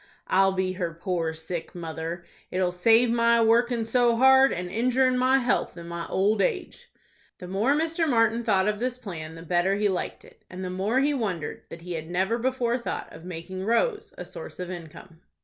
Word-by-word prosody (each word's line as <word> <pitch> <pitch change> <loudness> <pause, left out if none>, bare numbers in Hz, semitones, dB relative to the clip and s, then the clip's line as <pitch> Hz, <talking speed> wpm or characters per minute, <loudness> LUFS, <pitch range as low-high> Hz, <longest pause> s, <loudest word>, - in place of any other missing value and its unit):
I'll 195 +1 +3
be 190 0 -1
her 175 -3 -4
poor 170 -2 -2
sick 160 +2 -6
mother. 165 0 -5 0.2
It'll 180 -1 0
save 225 +6 +4
my 235 0 +3
workin' 230 +1 +3
so 240 +1 +3
hard, 265 +2 +6
and 180 +1 -3
injurin' 255 +6 +2
my 255 +1 +4
health 245 -7 0
in 170 0 -8
my 170 0 -5
old 205 +3 +1
age." 445 -7 -2 0.5
The 180 - -9
more 210 +10 +1
Mr. 325 +1 0
Martin 230 -1 +2
thought 200 -3 +2
of 210 -1 0
this 250 +1 -2
plan, 165 -9 -7
the 165 - -10
better 175 +3 +1
he 210 +1 +1
liked 185 - -4
it, - - -19
and 185 +1 -6
the 180 - -4
more 205 +8 +1
he 290 +1 +2
wondered 195 - -3
that 165 0 -10
he 180 0 -5
had 160 0 -5
never 190 +6 0
before 250 -1 0
thought 235 - -5
of 165 - -12
making 180 +2 -6
Rose 420 - 0
a 180 - -6
source 175 -1 -10
of 180 0 -5
income. 165 -1 -10
195 Hz, 200 wpm, -26 LUFS, 175-240 Hz, 0.5 s, hard